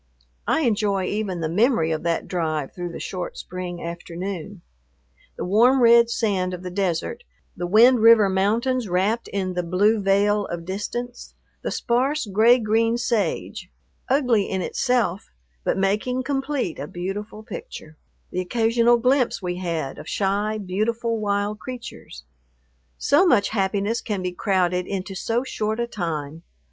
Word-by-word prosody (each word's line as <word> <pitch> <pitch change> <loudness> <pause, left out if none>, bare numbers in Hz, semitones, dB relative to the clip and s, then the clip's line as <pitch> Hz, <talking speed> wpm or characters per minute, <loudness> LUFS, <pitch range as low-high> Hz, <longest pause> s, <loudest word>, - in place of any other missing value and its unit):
I - - +2
enjoy 205 -6 +1
even 195 -4 -2
the 160 - 0
memory 180 - +2
of 155 - -1
that 170 -1 -1
drive 155 -5 -2
through 175 -1 -5
the - - -7
short 180 -2 -5
spring 180 -1 -6
afternoon, 175 +2 -6 0.7
the - - -3
warm 235 +8 +4
red 235 0 +6
sand 190 -6 0
of 180 - -11
the 180 - -5
desert; 195 - -2 0.3
the 175 -1 -3
Wind 235 +6 +6
River 225 -2 +7
Mountains 220 +5 0
wrapped 195 +6 0
in 190 -2 -2
the 180 - -1
blue 200 +5 +2
veil 200 +1 +2
of 170 -1 -6
distance; 240 +6 -5 0.3
the - - -3
sparse 265 +5 0
gray 220 +5 +5
green 225 +1 +1
sage, 235 -3 -2 0.4
ugly 250 -7 +2
in 190 -1 -1
itself, 240 -8 0 0.3
but - - 0
making 210 +7 0
complete 270 - -2
a 145 - -5
beautiful 205 +5 -6
picture; 155 -6 -9 0.4
the 185 - -1
occasional 230 +4 +3
glimpse 255 +1 +2
we 180 -2 -3
had 165 -6 -3
of - - -9
shy, 205 +2 0
beautiful 225 +4 -1
wild 205 0 -1
creatures. 250 -2 -9 0.7
So 290 +6 +4
much 225 -10 +3
happiness 200 +2 0
can 205 -4 -3
be 180 - -2
crowded 180 -1 0
into 195 0 -4
so 230 +6 -1
short 220 -3 -2
a 235 - +1
time. 165 -8 -4
205 Hz, 150 wpm, -23 LUFS, 180-235 Hz, 0.7 s, River